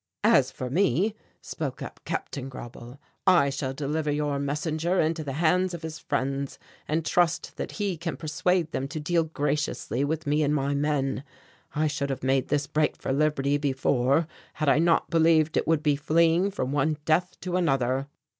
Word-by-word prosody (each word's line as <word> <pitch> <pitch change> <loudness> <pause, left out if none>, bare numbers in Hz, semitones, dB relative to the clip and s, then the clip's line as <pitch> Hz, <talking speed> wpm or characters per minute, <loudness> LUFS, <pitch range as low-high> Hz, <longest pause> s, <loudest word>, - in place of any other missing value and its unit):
"As - - +5
for 125 -1 -5
me," 185 - +2 0.3
spoke - - -4
up - - -8
Captain 135 -1 -4
Grauble, 120 0 -10 0.3
"I 170 -7 +5
shall 135 -1 -3
deliver 150 +3 -2
your 145 -1 0
messenger 155 +5 -1
into 160 0 +1
the 140 -2 -4
hands 175 +4 +2
of 165 - -9
his 160 0 -6
friends, 135 +1 -2 0.3
and 155 +1 0
trust 175 -1 +1
that - - -4
he 200 -4 -2
can 165 0 -4
persuade 165 +2 0
them 135 -3 -2
to 150 +3 -5
deal 165 +2 +1
graciously 150 -4 -1
with 155 +2 -2
me 150 +1 +2
and 150 0 +2
my 140 0 0
men. 140 -2 0 0.5
I 155 +1 +2
should 145 -2 -1
have 135 - -4
made 135 0 +2
this 145 -1 0
break 150 +1 0
for 135 - -2
liberty 145 -1 +1
before 135 +1 +2 0.3
had 155 - 0
I 145 - +4
not 165 0 +2
believed 160 -1 +4
it - - +1
would 160 -2 +2
be 150 -2 +3
fleeing 165 +5 +3
from 165 -9 -3
one 145 +2 +1
death 175 +3 +1
to 180 -1 -3
another." 135 -6 +1
150 Hz, 180 wpm, -26 LUFS, 140-165 Hz, 0.5 s, As